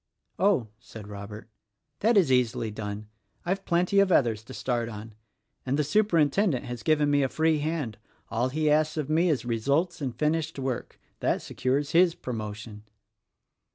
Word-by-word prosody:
"Oh," 185 - +2
said 110 -3 -11
Robert, 105 +2 -8 0.5
"that 225 +1 +3
is 170 -9 +4
easily 120 -3 +1
done. 105 0 -6 0.4
I've 195 +2 -2
plenty 180 +3 +2
of 200 -1 +4
others 115 -9 +2
to 130 - -10
start 120 -2 -1
on. 110 0 -9 0.5
And 135 +2 -1
the 150 - +2
Superintendent 165 - +2
has 120 -1 -6
given 150 +3 +2
me 145 0 +3
a 135 - +1
free 160 +1 +2
hand. 145 -8 -3 0.3
All 120 +3 0
he 155 +3 -1
asks 155 +1 +2
of 150 -1 -2
me 170 +3 +3
is 145 -6 0
results 140 +10 0
in 130 -4 -2
finished 150 +5 -1
work. 130 -3 -4 0.2
That - - 0
secures 140 +3 -1
his 170 0 +4
promotion." 110 -2 -6
140 Hz, 160 wpm, -27 LUFS, 115-160 Hz, 0.5 s, is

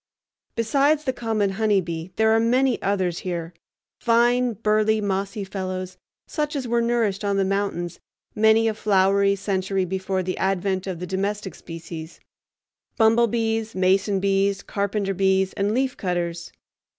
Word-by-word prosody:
Besides 280 +6 +2
the 260 -3 -1
common 220 -5 -1
honeybee 190 -6 0
there 220 +1 +3
are 225 - +4
many 250 +2 +2
others 190 -4 0
here, 170 -2 -4 0.5
fine, 240 +1 +3
burly, 215 0 +2
mossy 200 0 -2
fellows, 185 -1 -5 0.3
such 300 -1 -3
as 265 -3 -3
were 235 0 +1
nourished 230 -4 0
on 200 -1 0
the 195 - +2
mountains 195 -3 -2 0.3
many 220 +1 +4
a 220 - +1
flowery 200 -1 +3
century 195 -1 -1
before 190 +1 -2
the 185 +1 -3
advent 190 0 0
of 185 -2 -3
the 180 - -5
domestic 195 +2 -3
species—bumblebees, 220 +7 -2
mason 190 +2 +2
bees, 195 0 +1
carpenter 200 -1 -2
bees, 190 0 +2
and 200 +1 0
leaf 260 +3 0
cutters. 175 -2 -3
200 Hz, 135 wpm, -23 LUFS, 190-225 Hz, 0.5 s, are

